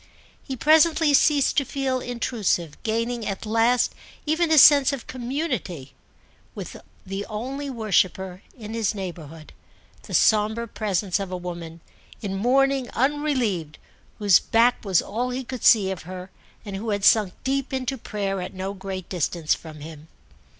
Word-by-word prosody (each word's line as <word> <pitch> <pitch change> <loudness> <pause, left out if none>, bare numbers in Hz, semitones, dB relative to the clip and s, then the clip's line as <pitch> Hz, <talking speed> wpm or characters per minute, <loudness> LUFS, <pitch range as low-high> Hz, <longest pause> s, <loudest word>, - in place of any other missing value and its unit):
He 265 - -6
presently 310 +2 +4
ceased 285 0 +3
to 285 - +4
feel 265 -1 -2
intrusive, 230 - -2
gaining 230 +1 -2
at 195 +1 -4
last 230 +3 +2 0.3
even 320 +2 +1
a 315 - +4
sense 285 -1 +8
of 275 -4 -5
community 240 - -4 0.6
with - - -7 0.3
the 195 +1 -4
only 265 +6 -5
worshipper 190 -5 0 0.2
in 220 -2 -8
his 225 -2 -1
neighbourhood, 165 -5 -8 0.5
the - - -5
sombre 220 +2 +3
presence 200 -3 -1
of 195 -2 -5
a 185 - -3
woman, 170 -2 -7 0.4
in 200 -2 -4
mourning 265 +4 +2
unrelieved, 255 - 0 0.4
whose 205 -4 +5
back 235 +2 +2
was 190 -5 +2
all 240 +4 -3
he 255 +1 -3
could 255 -1 -7
see 200 -4 +5
of 190 - -5
her 185 +2 -9 0.3
and 200 -2 -6
who 220 +3 -5
had 205 -1 0
sunk 210 -5 +4
deep 275 0 -1
into 265 0 -2
prayer 200 -5 -3
at 180 - -7
no 190 +1 -4
great 190 -2 -6
distance 170 -2 -1
from 155 -2 -9
him. 155 0 -10
215 Hz, 150 wpm, -24 LUFS, 185-260 Hz, 0.6 s, sense